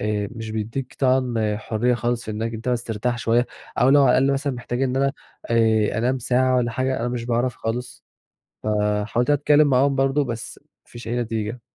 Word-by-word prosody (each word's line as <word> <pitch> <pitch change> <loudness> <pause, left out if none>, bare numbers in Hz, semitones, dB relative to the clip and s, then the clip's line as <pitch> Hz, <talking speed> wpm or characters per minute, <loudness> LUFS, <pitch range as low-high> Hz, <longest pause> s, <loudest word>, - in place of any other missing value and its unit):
آآ، 105 -1 -1
مش 115 -2 -7
بيدّيك 115 +5 -4
طبعًا 125 -5 +1
حُرّية 115 +3 0
خالص 120 0 -2
في 110 - -5
إنك 115 +2 -3
أنت 115 +3 -5
بس 120 -1 0
ترتاح 120 +2 -2
شوية 120 +1 +2 0.3
أو 125 - +4
لو 140 +1 +6
على 130 - +5
الأقل 135 +1 +3
مثلًا 140 0 -1
محتاج 120 +1 -4
إن 130 -1 0
أنا 140 +1 +2 0.4
آآ 110 -2 +2
أنام 130 +3 +1
ساعة 130 +1 +2
والّا 120 -1 +1
حاجة، 130 +2 -1
أنا 120 - -1
مش 120 -1 -3
باعرَف 120 +1 0
خالص، 120 +2 -5 0.6
فحاولت 105 +3 0
أتكلّم 145 +1 +4
معاهم 135 +1 +3
برضه 135 +2 +2
بس 115 -2 -6
ما 150 - -41 0.2
فيش 120 0 -9
أي 120 - -2
نتيجة. 115 +1 -3
120 Hz, 195 wpm, -23 LUFS, 115-130 Hz, 0.6 s, لو